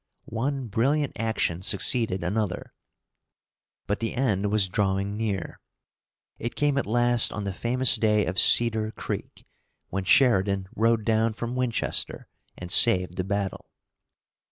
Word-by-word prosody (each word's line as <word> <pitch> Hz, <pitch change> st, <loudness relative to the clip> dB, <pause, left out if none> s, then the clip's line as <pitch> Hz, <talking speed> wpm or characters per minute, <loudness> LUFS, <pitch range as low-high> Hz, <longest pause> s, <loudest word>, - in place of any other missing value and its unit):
One 130 Hz, +4 st, -3 dB
brilliant 135 Hz, +7 st, 0 dB
action 110 Hz, -6 st, -2 dB
succeeded 100 Hz, -1 st, +1 dB
another, 100 Hz, +1 st, -3 dB, 1.1 s
but 105 Hz, -, -2 dB
the 115 Hz, -, -3 dB
end 105 Hz, -6 st, 0 dB
was 105 Hz, -2 st, +2 dB
drawing 100 Hz, +1 st, -1 dB
near. 105 Hz, -5 st, -4 dB, 0.8 s
It 120 Hz, -, -5 dB
came 145 Hz, -1 st, +1 dB
at -, -, -4 dB
last 120 Hz, +1 st, +3 dB
on 105 Hz, -, -5 dB
the 100 Hz, -1 st, -4 dB
famous 125 Hz, +5 st, +3 dB
day 105 Hz, -2 st, +2 dB
of 95 Hz, +2 st, -1 dB
Cedar 110 Hz, -2 st, +4 dB
Creek, -, -, -7 dB, 0.4 s
when 95 Hz, +1 st, -3 dB
Sheridan 100 Hz, -5 st, +3 dB
rode 115 Hz, 0 st, +1 dB
down 110 Hz, 0 st, +1 dB
from 120 Hz, +2 st, -5 dB
Winchester 125 Hz, -2 st, -1 dB, 0.3 s
and 90 Hz, 0 st, -8 dB
saved 90 Hz, -6 st, +3 dB
the 95 Hz, -, -1 dB
battle. 100 Hz, 0 st, -4 dB
110 Hz, 130 wpm, -25 LUFS, 95-120 Hz, 1.1 s, Cedar